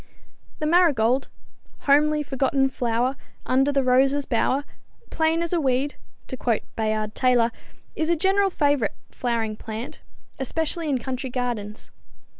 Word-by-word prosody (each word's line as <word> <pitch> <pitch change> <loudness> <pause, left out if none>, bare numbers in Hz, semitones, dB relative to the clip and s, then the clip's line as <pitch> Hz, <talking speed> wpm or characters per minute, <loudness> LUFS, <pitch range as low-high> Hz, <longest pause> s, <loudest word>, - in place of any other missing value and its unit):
The 305 - -3
marigold, 280 -7 +3 0.5
"homely 300 +1 +3
forgotten 270 0 +1
flower, 245 +1 0 0.3
under 270 +2 +2
the 275 -1 +1
rose's 270 +3 +3
bower, 265 +4 +1 0.5
plain 320 +1 +1
as 340 - -3
a 340 - +2
weed," 270 +1 +1 0.3
to - - -6
quote 235 -3 0
Bayard 215 -1 -1
Taylor, 245 -2 +3 0.4
is 315 +1 -1
a 340 - +4
general 390 +4 +2
favorite 285 - +1 0.2
flowering 230 -3 -2
plant, 220 +2 -7 0.4
especially 320 +4 -2
in 275 - +2
country 260 +2 -4
gardens. 240 -4 -4
265 Hz, 130 wpm, -24 LUFS, 240-300 Hz, 0.5 s, a